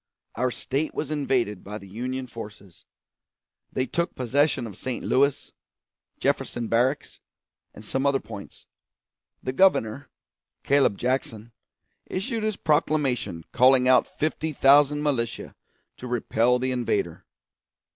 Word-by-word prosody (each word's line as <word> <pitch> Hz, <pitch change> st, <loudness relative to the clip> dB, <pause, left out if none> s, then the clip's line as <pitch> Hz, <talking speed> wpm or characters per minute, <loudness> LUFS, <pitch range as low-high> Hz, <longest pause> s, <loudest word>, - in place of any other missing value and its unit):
Our 125 Hz, +2 st, 0 dB
State 140 Hz, +5 st, -3 dB
was 150 Hz, 0 st, -3 dB
invaded 130 Hz, -9 st, 0 dB
by 105 Hz, +2 st, -6 dB
the 100 Hz, -, -12 dB
Union 130 Hz, +6 st, -4 dB
forces. 105 Hz, -6 st, -11 dB, 0.9 s
They 130 Hz, -, -1 dB
took 170 Hz, +5 st, -2 dB
possession 130 Hz, +1 st, +1 dB
of 105 Hz, -4 st, -8 dB
St. 125 Hz, +2 st, -4 dB
Louis, 140 Hz, +1 st, +1 dB, 0.7 s
Jefferson 120 Hz, -1 st, -1 dB
Barracks, 130 Hz, +6 st, 0 dB, 0.6 s
and 105 Hz, -, -11 dB
some 135 Hz, +5 st, 0 dB
other 140 Hz, -1 st, +2 dB
points. 105 Hz, -5 st, -11 dB, 0.8 s
The 130 Hz, -, -2 dB
Governor, 140 Hz, -, +2 dB, 0.5 s
Claib 140 Hz, -7 st, +3 dB
Jackson, 120 Hz, -3 st, -2 dB, 0.6 s
issued 225 Hz, +5 st, -3 dB
his 215 Hz, -1 st, -1 dB
proclamation 140 Hz, -, 0 dB
calling 125 Hz, 0 st, +5 dB
out 130 Hz, -1 st, +5 dB
fifty 155 Hz, 0 st, -2 dB
thousand 145 Hz, +2 st, +5 dB
militia 125 Hz, -6 st, -2 dB, 0.4 s
to 125 Hz, -, -8 dB
repel 120 Hz, 0 st, +2 dB
the 130 Hz, +1 st, -1 dB
invader. 125 Hz, -2 st, -2 dB
130 Hz, 120 wpm, -25 LUFS, 115-145 Hz, 0.9 s, calling